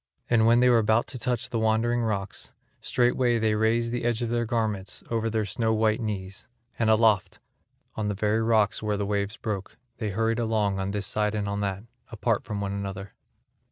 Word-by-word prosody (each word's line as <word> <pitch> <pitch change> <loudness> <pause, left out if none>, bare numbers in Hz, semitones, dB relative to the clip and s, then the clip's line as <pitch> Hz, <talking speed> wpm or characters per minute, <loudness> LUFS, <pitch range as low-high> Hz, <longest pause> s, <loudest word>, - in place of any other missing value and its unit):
And 115 -2 +4
when 120 +1 +5
they 125 - +5
were 120 -2 +5
about 110 +1 +2
to 130 - -4
touch 120 -1 -1
the 115 - 0
Wandering 115 +2 +1
rocks, 100 -4 -3 0.3
straightway 120 0 +2
they 110 -1 +1
raised 115 +2 +1
the 120 0 -2
edge 120 0 0
of 115 - -2
their 120 0 0
garments 110 -5 -2
over 115 -1 0
their 110 -1 0
snow 110 +3 0
white 110 +1 +1
knees, 100 -3 -5 0.3
and 110 -1 +2
aloft, 110 -3 +3 0.6
on 110 -1 -2
the 105 - -1
very 105 +2 +1
rocks 110 -2 +2
and 110 - -5
where 105 -1 0
the 100 - -1
waves 100 +1 -2
broke, 100 -3 -5 0.2
they 110 -3 -2
hurried 115 +3 0
along 110 -4 0
on 95 0 -2
this 100 0 -2
side 105 0 0
and 105 -1 -2
on 100 0 -2
that 100 0 -2 0.3
apart 115 -1 0
from 105 -1 -4
one 100 -1 -2
another. 100 -1 -5
110 Hz, 205 wpm, -26 LUFS, 100-115 Hz, 0.6 s, when